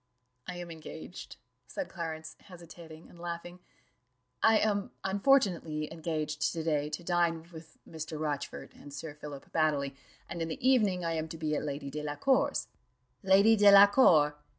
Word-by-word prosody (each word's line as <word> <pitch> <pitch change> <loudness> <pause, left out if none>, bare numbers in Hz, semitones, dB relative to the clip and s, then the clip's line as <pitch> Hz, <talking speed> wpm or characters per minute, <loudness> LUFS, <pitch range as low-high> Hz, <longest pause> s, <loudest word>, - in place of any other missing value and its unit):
"I 180 - -5
am 175 -1 -7
engaged," 160 +2 -9 0.3
said 290 - -5
Clarence, 160 -2 -6
hesitating 170 -3 -13
and 170 - -17
laughing 175 +1 -6 0.8
"I 225 0 +5
am 205 -2 0
unfortunately 190 - +1
engaged 155 -2 -2
to 165 -2 -4
day 150 -2 0
to 155 +3 -5
dine 170 -2 0
with 160 0 -12
Mr. 160 -1 -6
Rochfort 150 -2 -4
and 145 - -13
Sir 150 +2 -7
Philip 145 -2 -10
Baddely, 145 -4 0 0.3
and 170 - -6
in 165 - -1
the 165 +10 -3
evening 205 -9 +3
I 165 - -1
am 160 0 -2
to 165 - -8
be 155 -1 -1
at - - -1
Lady 140 -1 -5
Delacour's." 150 - 0 0.5
"Lady 200 +3 +5
Delacour! 200 - +6
165 Hz, 150 wpm, -30 LUFS, 155-185 Hz, 0.8 s, Delacour